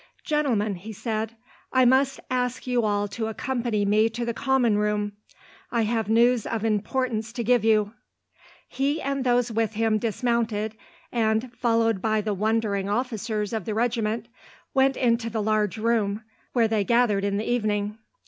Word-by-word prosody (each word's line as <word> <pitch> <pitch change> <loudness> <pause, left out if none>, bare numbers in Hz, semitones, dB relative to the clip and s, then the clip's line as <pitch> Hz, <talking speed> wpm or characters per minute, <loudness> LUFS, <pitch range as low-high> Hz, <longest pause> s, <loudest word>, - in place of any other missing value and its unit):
"Gentlemen," 245 -9 +1
he 215 +5 -8
said, 220 +1 -3 0.4
"I 255 -1 +4
must 265 +2 +3
ask 250 -1 -1
you 245 -2 +1
all 205 -1 +1
to 220 +2 -3
accompany 230 -2 -1
me 215 +2 +3
to 235 +2 -4
the 235 - -1
common 245 -5 +2
room. 210 0 0 0.6
I 235 -2 +1
have 220 -1 -1
news 235 +1 +3
of 225 -1 -2
importance 225 +1 -1
to 240 - -3
give 245 -1 +3
you." 215 -1 +3 0.7
He 280 +3 -1
and 275 -1 -2
those 245 -1 +2
with 225 0 0
him 220 0 +1
dismounted, 225 -1 -1 0.4
and, 225 +1 0
followed 230 -4 +1
by 215 +1 +1
the 210 0 -1
wondering 205 -1 0
officers 215 -2 -2
of 220 -5 -2
the 215 - -3
regiment, 225 -1 0 0.5
went 270 -1 +3
into 230 -2 +1
the 225 0 -3
large 215 0 +1
room 215 -2 0 0.3
where 235 -3 +3
they 220 -2 +1
gathered 235 -3 +2
in 200 0 0
the 215 - -3
evening. 210 -2 -1
225 Hz, 160 wpm, -25 LUFS, 210-245 Hz, 0.7 s, I